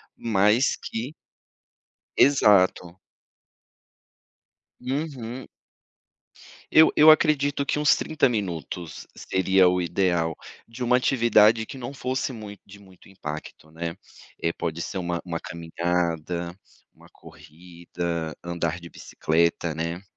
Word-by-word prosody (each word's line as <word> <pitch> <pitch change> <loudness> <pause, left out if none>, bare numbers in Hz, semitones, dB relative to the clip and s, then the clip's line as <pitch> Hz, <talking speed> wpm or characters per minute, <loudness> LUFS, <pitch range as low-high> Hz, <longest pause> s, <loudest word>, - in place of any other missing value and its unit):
mas 110 +3 +2
que 120 +6 -5 1.0
Exato. 95 -9 +4 1.8
Uhum. 130 -2 -5 1.2
Eu 160 +1 +6
eu 155 +1 +8
acredito 145 -3 +3
que 145 - -1
uns 150 -1 +4
30 155 -3 +1
minutos 90 - -5
seria 95 0 +2
o 90 0 0
ideal 85 -2 0 0.3
de 120 +2 -6
uma 125 +1 +4
atividade 115 -3 +4
que 135 - -10
não 130 +2 -7
fosse 130 0 -2
mui 105 -4 -9
de 100 0 -14
muito 95 -2 -19
impacto, 80 -4 -8
né, 85 +1 -5 0.5
eh, 85 - +1
pode 85 0 -4
ser 95 - -5
uma 85 -1 -2
uma 85 -2 -4
caminhada, 85 0 -3 0.4
uma - - -20
corrida, 85 0 -7
andar 85 -1 -2
de 85 0 -11
bicicleta, 85 0 -1
né. 85 +3 -4
95 Hz, 110 wpm, -25 LUFS, 85-120 Hz, 1.8 s, eu